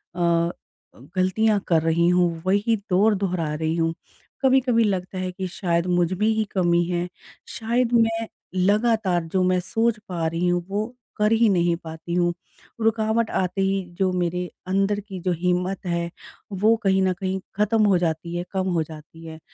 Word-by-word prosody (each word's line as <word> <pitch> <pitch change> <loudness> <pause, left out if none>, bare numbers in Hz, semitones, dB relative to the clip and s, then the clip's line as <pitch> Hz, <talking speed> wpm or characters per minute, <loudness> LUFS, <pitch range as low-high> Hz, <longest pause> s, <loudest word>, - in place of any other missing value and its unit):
अ, 170 -1 +2 0.6
गलतियाँ 205 +3 +2
कर 165 -2 +3
रही 165 +1 +2
हूँ, 175 -2 +2
वही 205 +4 +2
दौर 205 +4 +4
दोहरा 180 -5 -1
रही 160 +1 -1
हूँ। 165 -1 0 0.5
कभी-कभी 260 -3 +3
लगता 190 -2 -2
है 185 0 -2
कि 185 +1 -4
शायद 175 -2 -1
मुझमे 180 +3 +1
ही 220 0 +2
कमी 175 -2 +2
है। 175 0 -1 0.4
शायद 235 +2 -1
मैं 225 -1 +2 0.3
लगातार 200 -2 +2
जो 185 -1 +3
मैं 180 0 +2
सोच 225 +5 0
पा 170 -2 -2
रही 165 +2 -1
हूँ 175 0 +1
वो 205 +2 -1 0.3
कर 210 +1 +2
ही 225 0 +4
नहीं 175 -3 +2
पाती 160 +1 -7
हूँ। 175 0 +2 0.5
रुकावट 220 0 +1
आते 185 +1 -1
ही 195 0 +1 0.2
जो 190 -1 +2
मेरे 180 0 -1 0.2
अंदर 195 +2 +1
की 195 -2 -8
जो 180 +1 -1
हिम्मत 180 +1 -1
है 170 -1 -1 0.4
वो 210 +4 +3
कहीं 190 -1 +3
न 185 -1 +2
कहीं 190 -1 -2 0.2
ख़त्म 215 +2 +2
हो 195 -3 +4
जाती 170 0 -2
है, 175 - -2
कम 190 -1 -1
हो 165 - +1
जाती 160 +1 -12
है। 160 -1 -9
185 Hz, 170 wpm, -23 LUFS, 175-210 Hz, 0.6 s, दौर